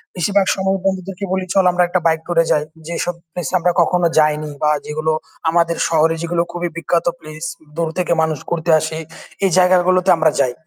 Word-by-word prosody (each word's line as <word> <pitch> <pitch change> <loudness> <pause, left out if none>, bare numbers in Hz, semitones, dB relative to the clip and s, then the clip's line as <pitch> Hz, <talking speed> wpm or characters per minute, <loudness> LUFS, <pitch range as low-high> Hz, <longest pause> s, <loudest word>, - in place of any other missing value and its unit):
বেশিরভাগ 195 +3 +1
সময় 190 0 0
বন্ধুদেরকে 190 0 -2
বলি 190 -1 -1
"চল 195 - +4
আমরা 180 0 +2
একটা 185 +1 0
বাইক 160 -1 +2
টুর 175 -1 -3
এ - - -7
যাই।" 150 - +2 0.2
যেসব 170 +1 -2 0.2
প্লেস 175 +1 -4
এ - - +3
আমরা 175 +1 +2
কখনো 175 +1 +2
যাইনি 150 0 +1
বা 150 - +4 0.2
যেগুলো 155 +1 -1 0.4
আমাদের 170 0 +1
শহরে 165 0 +2
যেগুলো 170 0 0
খুবই 175 0 -3
বিখ্যাত 170 0 0
প্লেস 155 0 -10 0.3
দূর 165 0 -1
থেকে 180 -1 +1
মানুষ 160 -1 0
ঘুরতে 170 0 0
আসে 155 +1 -4 0.5
এই - - +3
জায়গাগুলোতে 185 0 +3
আমরা 155 -1 +3
যাই। 125 -3 +1
170 Hz, 190 wpm, -18 LUFS, 160-180 Hz, 0.5 s, চল